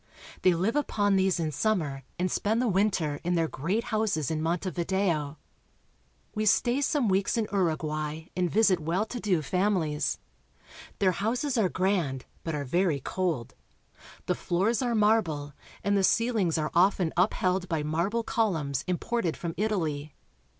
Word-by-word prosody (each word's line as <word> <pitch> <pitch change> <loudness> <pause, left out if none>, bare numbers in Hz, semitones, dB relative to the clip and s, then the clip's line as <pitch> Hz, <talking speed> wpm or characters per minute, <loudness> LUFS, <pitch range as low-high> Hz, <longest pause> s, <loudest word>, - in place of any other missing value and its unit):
They 180 -2 +4
live 190 +9 0
upon 205 -9 +1
these 190 -2 +2
in 160 -2 -1
summer 150 -5 -1 0.2
and 180 +1 -1
spend 220 +3 0
the 250 - +1
winter 190 -7 +1
in 175 +1 0
their 165 -1 +2
great 185 - -2
houses 200 - 0
in 155 -1 -1
Montevideo. 170 -2 -1 1.0
We 215 -1 -1
stay 240 +6 +3
some 285 -3 +1
weeks 195 +4 +1
in 225 - +1
Uruguay 155 -4 -1
and 180 -1 +1
visit 200 -3 +3
well 170 +7 0
to 245 +2 -6
do 185 -8 +1
families. 180 -3 0 0.8
Their 190 -2 +3
houses 240 - -1
are 215 -6 +2
grand, 175 -10 0 0.2
but 165 -2 -3
are 145 -1 -3
very 170 +1 +1
cold. 160 -5 -2 0.7
The - - +1
floors 200 +8 0
are 240 -2 0
marble, 190 -10 +1 0.3
and 200 0 +2
the 200 - +3
ceiHngs 205 -5 +2
are 155 0 -2
often 180 -1 +3
upheld 185 0 +1
by 160 -3 -1
marble 170 +10 0
columns 160 - 0
im 180 -1 0
ported 230 -8 -2
from 170 -1 -4
Italy. 160 -9 -2
185 Hz, 155 wpm, -28 LUFS, 160-210 Hz, 1.0 s, They